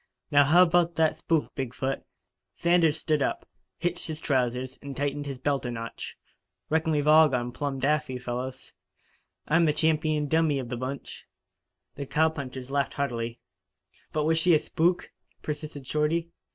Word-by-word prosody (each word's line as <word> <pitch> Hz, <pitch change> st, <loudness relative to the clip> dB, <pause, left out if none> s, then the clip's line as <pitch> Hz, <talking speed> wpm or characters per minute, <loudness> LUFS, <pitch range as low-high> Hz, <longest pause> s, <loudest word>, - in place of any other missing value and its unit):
"Now 145 Hz, -1 st, +6 dB
how 175 Hz, +6 st, +7 dB
about 175 Hz, -1 st, +2 dB
that 160 Hz, -1 st, +3 dB
spook, 160 Hz, -1 st, 0 dB
Big 130 Hz, -3 st, -4 dB
foot?" 135 Hz, +1 st, -2 dB, 0.5 s
Sanders 170 Hz, -3 st, +3 dB
stood 155 Hz, -1 st, 0 dB
up, -, -, -1 dB, 0.3 s
hitched 175 Hz, 0 st, -2 dB
his 155 Hz, -1 st, -5 dB
trousers 130 Hz, -2 st, -1 dB
and 140 Hz, -1 st, -7 dB
tightened 145 Hz, 0 st, -2 dB
his 135 Hz, -2 st, -4 dB
belt 140 Hz, +1 st, 0 dB
a 125 Hz, -, -3 dB
notch. 115 Hz, -1 st, -6 dB, 0.5 s
"Reckon 160 Hz, 0 st, +2 dB
we've 150 Hz, -1 st, +1 dB
all 155 Hz, 0 st, +7 dB
gone 125 Hz, -2 st, -1 dB
plumb 140 Hz, +1 st, -3 dB
daffy, 135 Hz, -1 st, 0 dB
fellows. 125 Hz, +1 st, -5 dB, 0.7 s
I'm 165 Hz, +2 st, +4 dB
the 150 Hz, -, +3 dB
champeen 155 Hz, -1 st, +1 dB
dummy 160 Hz, -1 st, +2 dB
of 130 Hz, -3 st, -4 dB
the 125 Hz, -, -2 dB
bunch." 130 Hz, +3 st, -6 dB, 0.7 s
The 140 Hz, -1 st, -5 dB
cowpunchers 140 Hz, -5 st, -1 dB
laughed 140 Hz, -1 st, 0 dB
heartily. 120 Hz, -4 st, -3 dB, 0.7 s
"But 155 Hz, -, 0 dB
was 160 Hz, +1 st, +2 dB
she 170 Hz, 0 st, +5 dB
a -, -, +4 dB
spook?" 175 Hz, +4 st, 0 dB, 0.3 s
persisted 150 Hz, -2 st, -5 dB
Shorty. 160 Hz, +4 st, 0 dB
145 Hz, 160 wpm, -27 LUFS, 130-160 Hz, 0.7 s, how